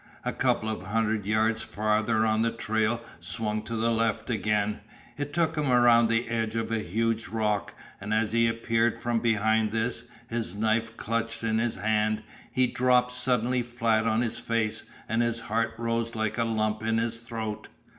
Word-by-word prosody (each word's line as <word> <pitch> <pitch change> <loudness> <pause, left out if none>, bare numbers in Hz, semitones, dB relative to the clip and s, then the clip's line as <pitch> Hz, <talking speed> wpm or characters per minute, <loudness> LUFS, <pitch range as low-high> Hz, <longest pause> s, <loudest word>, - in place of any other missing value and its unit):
A - - -1
couple 110 - +1
of 110 -4 -3
hundred 110 -1 0
yards 110 +1 +2
farther 110 +1 +1
on 110 0 +2
the 115 - +3
trail 110 0 0 0.2
swung 105 +5 -2
to 115 - -4
the 115 +1 +1
left 115 +1 0
again; 105 -1 0 0.4
it 145 0 -4
took 160 +1 +1
him 150 -4 0
around 120 -1 +6
the 115 +1 +1
end 115 -1 -1
of 115 0 -2
a 115 - +1
huge 115 +4 -1
rock, 105 -2 -1 0.2
and 105 +2 -6
as 110 0 +1
he 115 0 +4
appeared 115 0 +1
from 120 -1 0
behind 110 -1 +2
this, 115 +1 -1 0.2
his 115 -6 -3
knife 110 +2 0
clutched 115 +1 -2
in 110 0 +1
his 120 0 0
hand, 110 0 0 0.3
he 130 -1 +3
dropped 125 0 +2
suddenly 125 0 +1
flat 115 -2 +1
on 110 +1 +2
his 120 -1 -2
face, 115 -2 -1 0.3
and 115 +2 +1
his 120 -1 0
heart 115 +1 -1
rose 115 0 -1
like 110 +1 -1
a 115 - +2
lump 110 -1 0
in 110 0 +1
his 115 0 0
throat. 115 -2 -5
115 Hz, 180 wpm, -27 LUFS, 110-115 Hz, 0.4 s, around